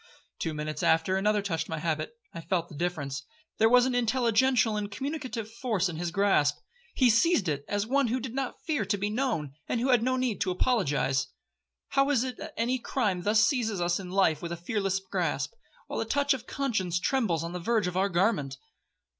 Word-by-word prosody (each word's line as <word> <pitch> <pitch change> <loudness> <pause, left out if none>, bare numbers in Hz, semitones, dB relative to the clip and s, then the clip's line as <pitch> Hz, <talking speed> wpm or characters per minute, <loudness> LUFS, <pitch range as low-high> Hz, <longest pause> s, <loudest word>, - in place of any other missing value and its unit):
Two 160 -1 -2
minutes 150 0 -4
after 165 +4 +3
another 210 +1 +1
touched 165 -5 -2
my 160 - -3
habit. 155 +6 -2 0.2
I 170 - -6
felt 170 -1 -1
the 155 - -11
difference,—there 175 - -2
was 245 +1 +6
an 260 - 0
intelligential 245 -1 +2
and 210 -1 -2
communicative 255 -2 -4
force 215 -7 0
in 165 - -6
his 175 +1 -2
grasp. 170 -6 +2 0.4
He 255 - +4
seized 230 - +3
it 145 -2 -1
as 205 0 -1
one 275 +3 +2
who 245 +3 0
did 240 -1 -6
not 270 -1 -4
fear 300 -8 0
to 200 +1 -1
be 205 +1 -2
known, 215 - -1 0.2
and 235 - 0
who 255 +3 0
had 245 -3 +5
no 255 +2 +1
need 250 -6 -1
to 185 - +1
apologise. 180 - +1 0.6
How 275 0 +2
is 265 -4 +3
it 255 -1 -4
that 315 -1 -9 0.3
crime 205 -9 0
thus 210 +3 +4
seizes 225 -8 0
us 175 +1 +1
in 185 -2 -7
life 180 -5 +2
with 170 - -5
a 170 - -3
fearless 195 +1 -1
grasp, 175 -7 -2 0.3
while - - -4
the 225 - -1
touch 285 +5 +2
of 255 -2 -7
conscience 195 -11 -1
trembles 195 - 0
on 170 +1 -5
the 180 - -3
verge 220 +3 +1
of 180 0 -3
our 195 +2 +2
garment. 175 -7 +1
205 Hz, 205 wpm, -28 LUFS, 170-245 Hz, 0.6 s, was